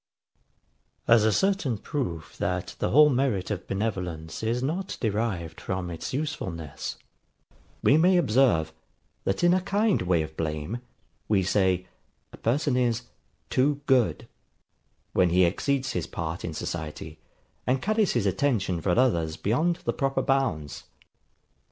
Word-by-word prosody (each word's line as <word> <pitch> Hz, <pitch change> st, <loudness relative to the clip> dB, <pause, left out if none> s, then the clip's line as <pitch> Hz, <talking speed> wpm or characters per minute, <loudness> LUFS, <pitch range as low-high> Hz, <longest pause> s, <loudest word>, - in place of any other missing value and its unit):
As 115 Hz, -2 st, +6 dB
a 110 Hz, -, +4 dB
certain 190 Hz, -, +1 dB
proof 90 Hz, -, -4 dB
that -, -, -2 dB
the -, -, 0 dB
whole 150 Hz, +3 st, +7 dB
merit 125 Hz, -8 st, 0 dB
of 100 Hz, -2 st, -4 dB
benevolence 90 Hz, -6 st, -3 dB
is 115 Hz, +3 st, -1 dB
not 175 Hz, +8 st, -2 dB
derived 105 Hz, -7 st, -2 dB
from 95 Hz, -2 st, -3 dB
its 80 Hz, -, -5 dB
usefulness, 90 Hz, -, -4 dB, 0.9 s
we 145 Hz, -, +6 dB
may 180 Hz, +3 st, +5 dB
observe, 115 Hz, -, +3 dB, 0.5 s
that 95 Hz, -, 0 dB
in 175 Hz, 0 st, +6 dB
a 185 Hz, -, +2 dB
kind 205 Hz, +2 st, +1 dB
way 90 Hz, -3 st, +2 dB
of 80 Hz, 0 st, -9 dB
blame, 80 Hz, +8 st, -3 dB, 0.5 s
we 100 Hz, -3 st, +3 dB
say, 95 Hz, -1 st, +2 dB, 0.5 s
a -, -, -10 dB
person 135 Hz, +3 st, +1 dB
is 120 Hz, -2 st, +1 dB, 0.5 s
TOO 140 Hz, +2 st, +2 dB
GOOD; 120 Hz, -, +2 dB, 0.9 s
when 90 Hz, -1 st, +4 dB
he 90 Hz, +2 st, +4 dB
exceeds 130 Hz, +9 st, 0 dB
his 90 Hz, -, -2 dB
part 85 Hz, +1 st, -4 dB
in 80 Hz, -2 st, -4 dB
society, 80 Hz, -1 st, -5 dB, 0.5 s
and 130 Hz, +1 st, +2 dB
carries 215 Hz, +4 st, +1 dB
his -, -, +1 dB
attention 105 Hz, -, 0 dB
for 90 Hz, +3 st, +1 dB
others 85 Hz, -11 st, +2 dB
beyond 155 Hz, -, +1 dB
the -, -, +1 dB
proper 135 Hz, -1 st, 0 dB
bounds. 130 Hz, -, -1 dB
110 Hz, 140 wpm, -27 LUFS, 85-135 Hz, 0.9 s, whole